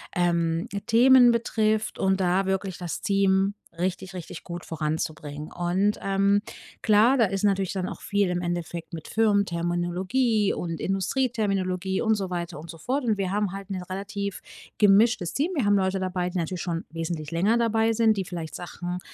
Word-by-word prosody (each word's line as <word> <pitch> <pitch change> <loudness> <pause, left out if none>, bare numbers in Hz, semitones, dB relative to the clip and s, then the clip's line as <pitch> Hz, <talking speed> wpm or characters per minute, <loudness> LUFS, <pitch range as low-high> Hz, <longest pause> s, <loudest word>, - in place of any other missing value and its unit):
ähm, 170 -2 +1 0.2
Themen 245 +2 +7
betrifft 220 -2 0
und 190 0 +2
da 185 +1 +2
wirklich 190 -1 -2
das 175 -3 -5
Team 195 0 +2 0.2
richtig, 185 +2 -3
richtig 175 -2 -8
gut 175 -1 -6
voranzubringen. 155 -1 -4
Und, 185 +4 0
ähm, 195 +1 +2 0.4
klar, 220 +5 +5
da 230 - +5
ist 195 0 -3
natürlich 195 -2 +1
dann 185 -2 -2
auch - - -8
viel 200 -2 0
im 180 0 -1
Endeffekt 175 -1 -4
mit 160 -2 -7
Firmenterminologie 200 +2 +1
und 165 -2 -4
Industrieterminologie 195 -3 -1
und 220 -1 +3
so 195 -3 -3
weiter 175 -3 -4
und 160 +3 -10
so 165 - -8
fort. 260 - -2
Und 220 -4 +1
wir 195 -1 -1
haben 205 -2 0
halt 195 0 -8
'nen 185 -2 -3
relativ 200 +2 -4 0.4
gemischtes 210 -2 +4
Team. 305 +6 0
Wir 255 - +1
haben 205 0 +4
Leute 190 0 +1
dabei, 180 -1 -1
die 180 - -4
natürlich 175 +1 -2
schon 170 -2 -3
wesentlich 165 -2 -4
länger 195 +8 +2
dabei 225 -1 +2
sind, 225 -1 +3
die 195 - -1
vielleicht 170 -3 -6
Sachen, 175 0 -5
190 Hz, 170 wpm, -26 LUFS, 175-210 Hz, 0.4 s, Themen